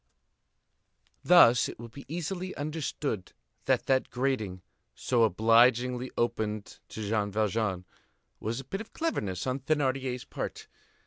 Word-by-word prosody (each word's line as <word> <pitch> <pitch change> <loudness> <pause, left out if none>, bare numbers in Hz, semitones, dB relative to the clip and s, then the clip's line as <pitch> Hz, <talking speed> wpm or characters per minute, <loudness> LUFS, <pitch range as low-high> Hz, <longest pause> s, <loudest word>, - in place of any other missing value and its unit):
Thus 145 -9 +6
it - - -9
will 120 - -8
be 135 +4 -12
easily 175 +4 -4
understood 145 - -3 0.3
that - - +2
that 130 -1 +2
grating, 120 -8 -2 0.3
so 120 -2 +1
obligingly 120 +4 +3
opened 110 -3 -2
to 110 -2 -5
Jean 105 -1 0
Valjean, 105 -3 0 0.5
was 115 +3 -3
a - - -6
bit 195 +9 -4
of 220 - -12
cleverness 105 - -2
on 130 +1 -1
Thénardier's 135 -3 -1
part. - - -6
125 Hz, 125 wpm, -29 LUFS, 110-140 Hz, 0.5 s, Thus